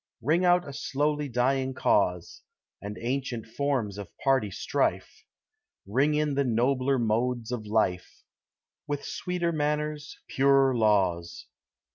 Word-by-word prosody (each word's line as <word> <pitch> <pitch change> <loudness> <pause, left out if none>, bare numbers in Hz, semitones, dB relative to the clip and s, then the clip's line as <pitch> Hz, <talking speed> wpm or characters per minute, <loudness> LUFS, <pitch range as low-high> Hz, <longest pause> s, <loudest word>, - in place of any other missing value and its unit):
Ring 160 +8 +2
out 180 0 +3
a 140 - -7
slowly 145 +1 -1
dying 130 +2 0
cause, 90 -7 0 0.4
And 105 +1 -6
ancient 125 -1 -3
forms 115 -5 -2
of 100 - -7
party 135 -6 +2
strife; 95 - -2 0.6
Ring 135 +9 +1
in 150 -1 +1
the 140 +1 +1
nobler 130 +2 +1
modes 120 +1 -1
of 110 -4 -4
life, 105 -4 -1 0.6
With 145 -1 -3
sweeter 180 -1 -2
manners, 150 -1 -2
purer 135 -1 +3
laws. 95 -7 +1
130 Hz, 120 wpm, -27 LUFS, 110-145 Hz, 0.6 s, out